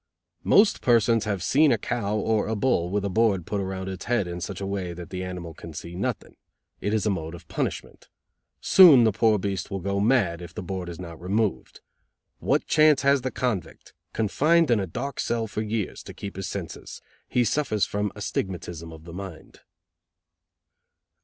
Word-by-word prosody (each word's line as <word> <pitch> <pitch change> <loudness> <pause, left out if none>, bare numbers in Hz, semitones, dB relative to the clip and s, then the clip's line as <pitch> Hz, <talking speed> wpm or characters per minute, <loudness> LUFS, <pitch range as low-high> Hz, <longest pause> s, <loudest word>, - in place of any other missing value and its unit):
"Most 205 +1 +4
persons 115 -2 +3
have 100 -4 -2
seen 150 +5 +4
a 120 - +3
cow 105 -1 -2
or 110 0 0
a 110 - -1
bull 105 -7 +1
with 100 +1 -1
a - - -1
board 100 -3 +2
put 100 -1 -2
around 95 0 -4
its 95 -1 -6
head 120 -5 +1
in 90 0 -6
such 95 0 -5
a 100 - -4
way 95 -3 -3
that 85 -1 -9
the 95 0 -4
animal 90 -3 -6
can 80 +1 -10
see 85 +3 -7
nothing. 90 +3 -4 0.4
It 105 - -2
is 110 -1 0
a 105 - +2
mode 80 -3 -4
of 85 - -14
punishment. - - -4 0.5
Soon 160 -10 +8
the 110 - +4
poor 110 +1 +3
beast 95 -2 -3
will 100 - -3
go 100 +2 -2
mad, 100 -7 +2
if 85 -1 -10
the - - -5
board 90 -1 -5
is 85 - -8
not 85 -3 -9
removed. 100 - -1 0.6
What - - +1
chance 155 -2 +4
has 140 0 +4
the 130 - -2
convict, 120 -8 -4 0.2
confined 150 +8 +2
in 115 - +4
a 95 - -2
dark 140 +11 -5
cell 115 -1 0
for 105 0 -4
years, 110 -1 -3
to - - -9
keep 100 - -7
his 95 0 -4
senses? 95 -4 -7 0.3
He 125 - +2
suffers 115 -3 +1
from 105 -1 -2
astigmatism 90 -5 -4
of 80 -1 -12
the 85 0 -10
mind." 90 -3 -9
100 Hz, 190 wpm, -25 LUFS, 90-115 Hz, 0.6 s, Soon